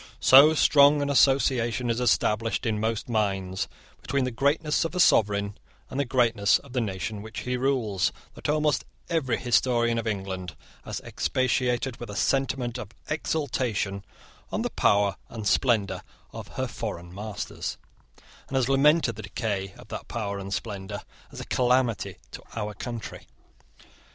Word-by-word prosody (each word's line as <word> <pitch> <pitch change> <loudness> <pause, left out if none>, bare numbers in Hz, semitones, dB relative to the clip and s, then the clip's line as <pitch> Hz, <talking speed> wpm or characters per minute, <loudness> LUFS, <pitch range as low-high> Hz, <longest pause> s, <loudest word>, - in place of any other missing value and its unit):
So 145 +4 +8
strong 145 -1 +5
an 140 - -1
association 125 -3 +3
is 115 - -1
established 115 -2 +1
in 110 -2 0
most 110 0 -1
minds 95 -5 -1 0.3
between 140 +2 0
the 130 - -1
greatness 145 +5 +1
of 165 +2 -4
a - - -1
sovereign 100 - +3 0.4
and 130 - -3
the 140 - +1
greatness 115 -5 +3
of 140 -3 -15
the 125 - +1
nation 105 0 -3
which 110 +2 -7
he 125 0 -2
rules, 125 -7 +1 0.2
that - - -5
almost 150 0 +2 0.3
every 140 -8 +1
historian 120 -1 +2
of 115 - -4
England 95 -5 -4 0.3
has - - -5
expatiated 125 -1 0
with 120 - -7
a 105 - -6
sentiment 130 -1 0
of 105 - -7 0.2
exultation 125 -10 -1 0.5
on - - -1
the - - -2
power 100 -1 +2
and 110 -3 -5
splendour 110 -1 +2 0.3
of - - -7
her - - 0
foreign 85 +1 -6
masters, 105 +1 -5 0.7
and 135 - -5
has 130 -2 +2
lamented 135 -3 +3
the - - -5
decay 100 -2 -3
of - - -14
that - - -6
power 100 -3 -3
and 100 0 -7
splendour 100 +1 -4 0.3
as - - -9
a - - -6
calamity 125 -4 +1 0.2
to - - -8
our 105 -2 -3
country. 115 +2 -7
115 Hz, 155 wpm, -26 LUFS, 105-130 Hz, 0.7 s, So